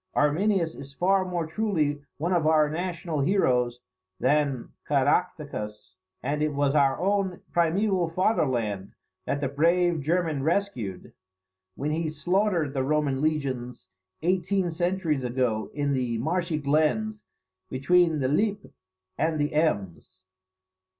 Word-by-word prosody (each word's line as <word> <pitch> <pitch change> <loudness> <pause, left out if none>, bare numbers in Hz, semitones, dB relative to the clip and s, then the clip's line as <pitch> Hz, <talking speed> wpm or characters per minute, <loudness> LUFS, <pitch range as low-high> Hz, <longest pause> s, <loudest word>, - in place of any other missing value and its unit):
Arminius 165 +3 +2
is 140 0 -11
far 190 +4 +3
more 175 -3 -2
truly 160 -5 -1 0.2
one 170 +5 -1
of 165 -3 +2
our 155 -1 +4
national 170 -1 -3
heroes 125 -8 +1 0.4
than 145 -4 +1 0.2
Caractacus: 140 - -1 0.3
and 145 +3 -1
it 150 -1 0
was 140 -1 +2
our 140 -3 +3
own 195 -1 0
primeval 175 +1 +2
fatherland 125 - 0 0.3
that 140 - -1
the 140 - +1
brave 170 +4 +2
German 160 -1 0
rescued, 135 - -2 0.6
when 150 +2 -2
he 160 0 -1
slaughtered 175 -2 0
the 135 - 0
Roman 140 -1 0
legions 130 -9 -2 0.3
eighteen 185 +1 +1
centuries 170 -4 0
ago 120 -3 -1
in 145 -1 -1
the 125 -3 -1
marshy 165 +5 -1
glens 155 +10 +1 0.5
between 165 +5 +3
the 135 -3 0
Lippe 205 +8 0 0.5
and 160 -1 +1
the 145 +1 0
Ems. 100 - -1
155 Hz, 125 wpm, -26 LUFS, 135-180 Hz, 0.6 s, our